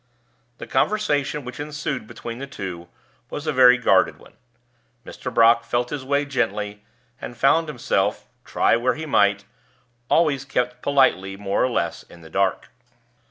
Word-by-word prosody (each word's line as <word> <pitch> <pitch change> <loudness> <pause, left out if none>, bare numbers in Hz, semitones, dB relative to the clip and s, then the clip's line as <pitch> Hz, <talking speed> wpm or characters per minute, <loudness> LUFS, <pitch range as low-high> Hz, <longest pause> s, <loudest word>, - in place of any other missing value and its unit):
The - - -8
conversation 150 -9 0
which 125 +2 -8
ensued 145 -5 -4
between 115 +2 -8
the 140 - -6
two 90 -9 -7 0.4
was 150 - -6
a 155 - -1
very 125 -1 +7
guarded 95 -7 +3
one. - - -18 0.7
Mr. - - -7
Brock 115 0 +5
felt 120 +1 -2
his 145 -3 -4
way 140 +2 0
gently, 105 -6 -2 0.4
and 120 - -8
found 160 +6 +3
himself, 105 -8 -1 0.2
try - - +2
where 120 +2 +1
he 160 - -6
might, 100 -7 +2 0.6
always 150 -5 +2
kept 125 -2 -2
politely, 95 -9 +2
more 100 0 -1
or 130 - +2
less, 120 - -2
in 85 - -17
the 80 -1 -14
dark. 95 +1 0
125 Hz, 155 wpm, -22 LUFS, 105-140 Hz, 0.7 s, very